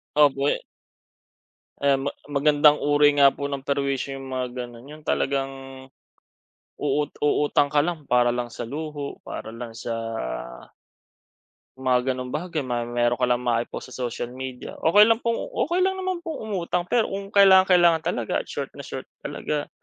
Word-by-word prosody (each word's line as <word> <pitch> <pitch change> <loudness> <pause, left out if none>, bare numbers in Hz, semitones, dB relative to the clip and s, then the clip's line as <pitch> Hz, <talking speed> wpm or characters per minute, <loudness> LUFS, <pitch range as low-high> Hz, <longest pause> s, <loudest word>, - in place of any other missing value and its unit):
Opo, 140 -2 +4
eh. - - 0 1.2
Ayan, 140 0 +2
ma - - -8
magandang 145 +1 +4
uri 145 0 +4
nga 140 - +9
po 140 - -6
ng 140 -1 -3
perwisyo 140 -1 -1
yung 135 -1 -7
mga 125 -1 -3
ganun, 120 +3 -13
yun 155 +1 -11
talagang, 135 0 0 1.2
uu 145 +1 0 0.2
uutang 145 -1 +2
ka 150 - +3
lang 160 -1 -1
para 120 -2 +2
lang 120 -1 -3
sa 115 - -6
luho 150 0 -5
para - - -7
lang 115 -1 -7
sa 115 0 -5 1.8
mga 130 0 +1
ganong 125 0 -3
bagay, 155 -3 -3
may 120 -1 -2
meron 120 +1 +1
ka 125 - +3
lang 120 - +3
mai-post 120 +2 -2
sa 125 -2 -3
social 120 +1 -5
media. 130 -1 -7
Okey 205 +6 +7
lang 225 +1 +3
pong, 230 0 0 0.2
okey 355 +5 +2
lang 380 - +1
naman 375 -1 -2
pong 290 -10 -5
umutang 180 -2 -2
pero 235 -3 +3
kung 195 0 -5
kailangang-kailangan 185 -4 +6
talaga - - -1
at - - -16
short - - -5
na - - -8
short - - -7 0.2
talaga. 150 -1 -3
140 Hz, 165 wpm, -24 LUFS, 125-165 Hz, 1.8 s, nga